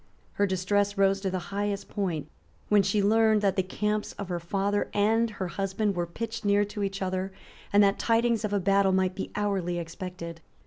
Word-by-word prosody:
Her 205 Hz, -, +1 dB
distress 200 Hz, +2 st, 0 dB
rose 195 Hz, 0 st, +3 dB
to 195 Hz, -, -1 dB
the 185 Hz, -, -2 dB, 0.2 s
highest 205 Hz, 0 st, -2 dB
point 180 Hz, -8 st, -2 dB, 0.4 s
when 210 Hz, -1 st, +6 dB
she 200 Hz, +1 st, +1 dB
learned 220 Hz, 0 st, +4 dB
that 195 Hz, -2 st, +2 dB
the 190 Hz, -, +3 dB
camps 210 Hz, +3 st, -2 dB
of 200 Hz, -2 st, -7 dB
her 175 Hz, -1 st, -2 dB
father 200 Hz, +4 st, -1 dB
and 225 Hz, +3 st, +3 dB
her 195 Hz, -3 st, -4 dB
husband 195 Hz, +2 st, -1 dB
were 175 Hz, -1 st, -1 dB
pitched 230 Hz, +6 st, -5 dB
near 205 Hz, 0 st, +3 dB
to 205 Hz, +1 st, -6 dB
each 195 Hz, -1 st, -2 dB
other, 185 Hz, +1 st, -2 dB, 0.4 s
and 205 Hz, 0 st, +6 dB
that 200 Hz, 0 st, +2 dB
tidings 230 Hz, 0 st, +2 dB
of 210 Hz, -, -1 dB
a 205 Hz, -, +2 dB
battle 195 Hz, 0 st, +3 dB
might 185 Hz, -1 st, +2 dB
be 190 Hz, -, -5 dB
hourly 195 Hz, -4 st, -1 dB
expected. 170 Hz, 0 st, -6 dB
200 Hz, 195 wpm, -28 LUFS, 185-205 Hz, 0.4 s, when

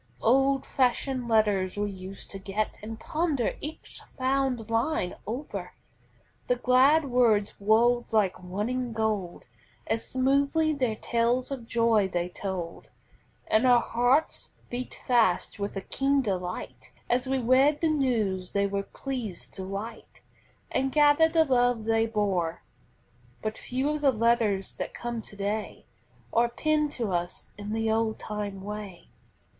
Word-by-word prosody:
Old 270 Hz, +3 st, +3 dB
fashioned 255 Hz, -1 st, 0 dB
letters 205 Hz, -4 st, +2 dB
we 205 Hz, 0 st, -1 dB
used 190 Hz, 0 st, -9 dB
to 195 Hz, -, -7 dB
get 200 Hz, +2 st, -3 dB
And 220 Hz, +2 st, -7 dB
ponder 305 Hz, -7 st, -1 dB
each 305 Hz, +2 st, -8 dB, 0.2 s
fond 260 Hz, -3 st, 0 dB
line 230 Hz, -, 0 dB
o'er; 250 Hz, +7 st, -5 dB, 0.7 s
The 250 Hz, -, +3 dB
glad 260 Hz, +5 st, +4 dB
words 235 Hz, -6 st, +2 dB
rolled 235 Hz, +4 st, +3 dB
like 210 Hz, -4 st, +3 dB
running 225 Hz, +7 st, -3 dB
gold, 215 Hz, -5 st, -2 dB, 0.4 s
As 225 Hz, -, -1 dB
smoothly 280 Hz, +4 st, +2 dB
their 255 Hz, -6 st, 0 dB
tales 235 Hz, +4 st, 0 dB
of 250 Hz, -4 st, -5 dB
joy 230 Hz, -4 st, +3 dB
they 175 Hz, -1 st, -2 dB
told, 180 Hz, -2 st, -5 dB, 0.6 s
And 220 Hz, +4 st, +3 dB
our 245 Hz, -1 st, +7 dB
hearts 245 Hz, +6 st, +1 dB, 0.2 s
beat 245 Hz, +1 st, -5 dB
fast 225 Hz, -7 st, +2 dB
with 200 Hz, 0 st, -3 dB
a 195 Hz, -, -3 dB
keen 275 Hz, +5 st, +1 dB
delight 185 Hz, -4 st, -4 dB, 0.2 s
As 250 Hz, +2 st, +1 dB
we 265 Hz, 0 st, +1 dB
read 265 Hz, +4 st, +4 dB
the 330 Hz, -, +3 dB
news 225 Hz, -, 0 dB
they 200 Hz, 0 st, +2 dB
were 200 Hz, 0 st, -1 dB
pleased 230 Hz, -4 st, -6 dB
to 190 Hz, -, -6 dB
write 205 Hz, +4 st, -7 dB, 0.5 s
And 270 Hz, 0 st, 0 dB
gathered 300 Hz, +2 st, +5 dB
the 325 Hz, -1 st, +5 dB
love 245 Hz, -4 st, +2 dB
they 225 Hz, 0 st, +2 dB
bore. 195 Hz, -7 st, -1 dB, 0.8 s
But 215 Hz, 0 st, -2 dB
few 260 Hz, +3 st, -2 dB
of 300 Hz, -1 st, -3 dB
the 280 Hz, -2 st, +5 dB
letters 225 Hz, -4 st, +1 dB
that -, -, -5 dB
come 235 Hz, -1 st, -4 dB
to 210 Hz, -, -12 dB
day 205 Hz, +2 st, -3 dB, 0.5 s
Are 235 Hz, +1 st, +3 dB
penned 300 Hz, +4 st, +1 dB
to 230 Hz, -5 st, -2 dB
us 175 Hz, 0 st, -3 dB
in 205 Hz, 0 st, -6 dB
the 225 Hz, 0 st, 0 dB
old 220 Hz, 0 st, +1 dB
time 205 Hz, -2 st, -5 dB
way. 205 Hz, -3 st, -7 dB
230 Hz, 145 wpm, -27 LUFS, 205-260 Hz, 0.8 s, our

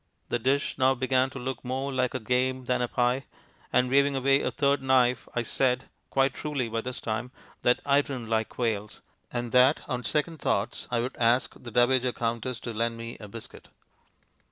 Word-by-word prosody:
The 120 Hz, -, 0 dB
dish 135 Hz, +3 st, 0 dB
now 130 Hz, 0 st, +4 dB
began 130 Hz, +1 st, +2 dB
to 135 Hz, -, -9 dB
look 130 Hz, 0 st, -4 dB
more 135 Hz, +2 st, -2 dB
like 130 Hz, -1 st, 0 dB
a -, -, 0 dB
game 130 Hz, +2 st, 0 dB
than 125 Hz, 0 st, +1 dB
a 125 Hz, -, +1 dB
pie, 125 Hz, +3 st, +1 dB, 0.5 s
and, 125 Hz, -, +3 dB
waving 140 Hz, +2 st, +3 dB
away 135 Hz, +1 st, +3 dB
a -, -, 0 dB
third 140 Hz, -1 st, +1 dB
knife, 130 Hz, -2 st, +3 dB
I 120 Hz, -, +1 dB
said 125 Hz, +1 st, 0 dB, 0.2 s
(quite 135 Hz, -1 st, +2 dB
truly 145 Hz, -5 st, -2 dB
by 115 Hz, 0 st, -2 dB
this 125 Hz, +2 st, -5 dB
time) 110 Hz, +2 st, -3 dB, 0.3 s
that 125 Hz, -, +3 dB
I 140 Hz, 0 st, +4 dB
didn't 130 Hz, -5 st, -6 dB
like 110 Hz, -1 st, 0 dB
quails, 110 Hz, -4 st, -3 dB, 0.3 s
and 120 Hz, -1 st, -3 dB
that 130 Hz, +4 st, +5 dB
on 125 Hz, -1 st, -3 dB
second 155 Hz, +5 st, -1 dB
thoughts 100 Hz, +4 st, -1 dB
I 120 Hz, -1 st, +1 dB
would 125 Hz, +2 st, -4 dB
ask 120 Hz, +2 st, +2 dB
the 120 Hz, -, -10 dB
Dowager 125 Hz, +1 st, +3 dB
Countess 120 Hz, +1 st, -2 dB
to 120 Hz, -, -5 dB
lend 115 Hz, +1 st, -1 dB
me 115 Hz, 0 st, -6 dB
a 105 Hz, -, -9 dB
biscuit. 110 Hz, +2 st, -11 dB
125 Hz, 195 wpm, -27 LUFS, 120-130 Hz, 0.5 s, that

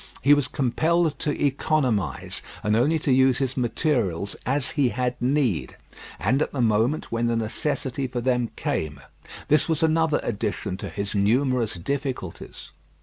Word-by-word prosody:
He 140 Hz, +3 st, +7 dB
was 145 Hz, -3 st, +2 dB
compelled 155 Hz, +4 st, +1 dB
to 150 Hz, -, -1 dB
economise, 130 Hz, -, 0 dB, 0.2 s
and 105 Hz, 0 st, +2 dB
only 145 Hz, +8 st, +3 dB
to 145 Hz, -3 st, -1 dB
use 130 Hz, -1 st, +4 dB
his 135 Hz, -1 st, -1 dB
materials 115 Hz, -, 0 dB
as 140 Hz, +3 st, +1 dB
he 140 Hz, -5 st, +2 dB
had 125 Hz, 0 st, -1 dB
need, 125 Hz, -, 0 dB, 0.4 s
and 120 Hz, -, +1 dB
at -, -, 0 dB
the 140 Hz, -, -5 dB
moment 115 Hz, +5 st, +1 dB
when 115 Hz, 0 st, 0 dB
the 115 Hz, -, +1 dB
necessity 130 Hz, +4 st, -1 dB
for 125 Hz, -1 st, -4 dB
them 125 Hz, -1 st, +1 dB
came. 75 Hz, -2 st, -3 dB, 0.5 s
This 150 Hz, +2 st, +3 dB
was 160 Hz, -1 st, +1 dB
another 160 Hz, -1 st, +3 dB
addition 105 Hz, -4 st, -2 dB
to -, -, -6 dB
his 100 Hz, -1 st, -4 dB
numerous 115 Hz, +2 st, +2 dB
difficulties. 130 Hz, -, -5 dB
130 Hz, 150 wpm, -24 LUFS, 110-145 Hz, 0.5 s, He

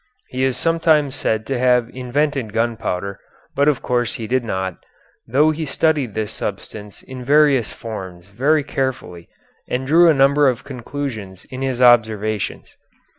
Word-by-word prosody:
He 130 Hz, +1 st, -2 dB
is 130 Hz, -1 st, +1 dB
sometimes 160 Hz, -2 st, +2 dB
said 110 Hz, -4 st, -1 dB
to 135 Hz, 0 st, -2 dB
have 125 Hz, -2 st, +3 dB
invented 130 Hz, -2 st, -1 dB
gunpowder, 110 Hz, -4 st, -2 dB, 0.4 s
but 140 Hz, +1 st, +2 dB
of 150 Hz, -3 st, +1 dB
course 120 Hz, -1 st, 0 dB
he 115 Hz, -4 st, -5 dB
did 125 Hz, +2 st, 0 dB
not, 95 Hz, -4 st, -4 dB, 0.4 s
though 145 Hz, +6 st, +3 dB
he 155 Hz, +1 st, -4 dB
studied 145 Hz, -5 st, 0 dB
this 110 Hz, 0 st, -2 dB
substance 105 Hz, 0 st, -7 dB
in 130 Hz, -1 st, -9 dB
various 140 Hz, -3 st, +3 dB
forms 95 Hz, -6 st, -8 dB
very 140 Hz, +8 st, +1 dB
carefully 130 Hz, -12 st, -4 dB, 0.4 s
and 130 Hz, +1 st, -2 dB
drew 165 Hz, +5 st, +5 dB
a 160 Hz, -, +4 dB
number 140 Hz, +1 st, +4 dB
of 125 Hz, 0 st, -3 dB
conclusions 120 Hz, -7 st, -6 dB
in 130 Hz, 0 st, -6 dB
his 130 Hz, -2 st, 0 dB
observations. 110 Hz, -3 st, +2 dB
125 Hz, 150 wpm, -20 LUFS, 110-140 Hz, 0.4 s, drew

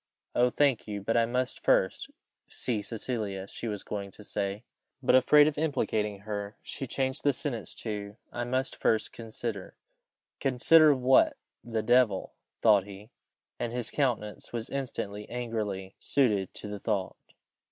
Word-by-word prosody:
"Oh! 125 Hz, +1 st, +4 dB
thank 135 Hz, -3 st, +2 dB
you; 105 Hz, -1 st, -3 dB
but 100 Hz, +3 st, -1 dB
I 115 Hz, -1 st, +4 dB
must 125 Hz, +1 st, -1 dB
first -, -, +2 dB, 0.2 s
" -, -, -60 dB
see 115 Hz, -4 st, 0 dB
Cecilia, 105 Hz, -4 st, -4 dB
she 115 Hz, -, -6 dB
was 105 Hz, -3 st, -3 dB
going 100 Hz, -1 st, -4 dB
to 105 Hz, -, -13 dB
say, 100 Hz, +1 st, -2 dB, 0.4 s
but, -, -, +4 dB
afraid 145 Hz, +3 st, +7 dB
of 150 Hz, -1 st, -1 dB
implicating 105 Hz, -9 st, 0 dB
her, 105 Hz, 0 st, -5 dB
she 135 Hz, -, -5 dB
changed 130 Hz, +2 st, -1 dB
the 145 Hz, -, +4 dB
sentence 120 Hz, -5 st, -3 dB
to 105 Hz, -1 st, -4 dB
"I 120 Hz, -, -3 dB
must 130 Hz, +2 st, -1 dB
first 110 Hz, -1 st, +1 dB
consider 110 Hz, -3 st, -5 dB, 0.3 s
" -, -, -64 dB
"Consider! 150 Hz, +4 st, +6 dB
what 130 Hz, 0 st, +4 dB, 0.3 s
the 115 Hz, -2 st, -2 dB
devil!" 115 Hz, -4 st, +3 dB, 0.3 s
thought 105 Hz, -4 st, +6 dB
he, 100 Hz, +3 st, -11 dB, 0.5 s
and 120 Hz, -, -2 dB
his 120 Hz, -2 st, -2 dB
countenance 120 Hz, -7 st, -1 dB
was 115 Hz, -1 st, -4 dB
instantly 105 Hz, -6 st, -4 dB
angrily 105 Hz, -6 st, -3 dB
suited 105 Hz, -9 st, +2 dB
to -, -, -6 dB
the 105 Hz, 0 st, -5 dB
thought. 100 Hz, -4 st, -1 dB
115 Hz, 155 wpm, -29 LUFS, 105-125 Hz, 0.5 s, afraid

